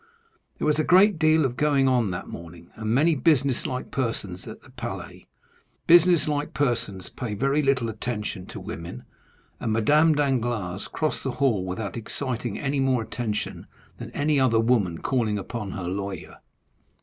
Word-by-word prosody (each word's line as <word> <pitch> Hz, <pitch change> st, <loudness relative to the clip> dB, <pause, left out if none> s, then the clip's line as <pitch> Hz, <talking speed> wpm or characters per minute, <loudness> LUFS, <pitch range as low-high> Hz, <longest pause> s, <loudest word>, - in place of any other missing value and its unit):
There -, -, -2 dB
was 150 Hz, 0 st, +2 dB
a -, -, +3 dB
great 185 Hz, +2 st, +5 dB
deal 155 Hz, -2 st, +4 dB
going 135 Hz, +2 st, +2 dB
on 125 Hz, -5 st, +2 dB
that 90 Hz, -1 st, -4 dB
morning, 85 Hz, 0 st, -10 dB
and 110 Hz, -1 st, -5 dB
many 150 Hz, +9 st, +4 dB
business 140 Hz, -4 st, +2 dB
like 125 Hz, 0 st, -5 dB
persons 110 Hz, -8 st, -3 dB
at -, -, -8 dB
the -, -, -17 dB
Palais; -, -, -7 dB, 0.6 s
business 175 Hz, -2 st, +6 dB
like 145 Hz, -2 st, -2 dB
persons 115 Hz, -9 st, -1 dB
pay 115 Hz, -5 st, -5 dB
very 135 Hz, +7 st, +1 dB
little 135 Hz, -4 st, +1 dB
attention 105 Hz, -4 st, -4 dB
to -, -, -8 dB
women, 85 Hz, -6 st, -7 dB, 0.6 s
and 110 Hz, -, -2 dB
Madame 150 Hz, +9 st, +4 dB
Danglars 120 Hz, -9 st, -1 dB
crossed 155 Hz, -1 st, -2 dB
the 135 Hz, -, -2 dB
hall 115 Hz, -9 st, +1 dB
without 100 Hz, +2 st, -4 dB
exciting 120 Hz, +1 st, -4 dB
any 140 Hz, 0 st, -1 dB
more 130 Hz, -3 st, +2 dB
attention 110 Hz, -2 st, -4 dB, 0.3 s
than -, -, -7 dB
any 145 Hz, 0 st, +2 dB
other 120 Hz, -4 st, +3 dB
woman 110 Hz, -8 st, +2 dB
calling 115 Hz, -6 st, +1 dB
upon 105 Hz, +1 st, -5 dB
her 95 Hz, -, -5 dB
lawyer. 95 Hz, -1 st, -5 dB
125 Hz, 160 wpm, -25 LUFS, 105-145 Hz, 0.6 s, business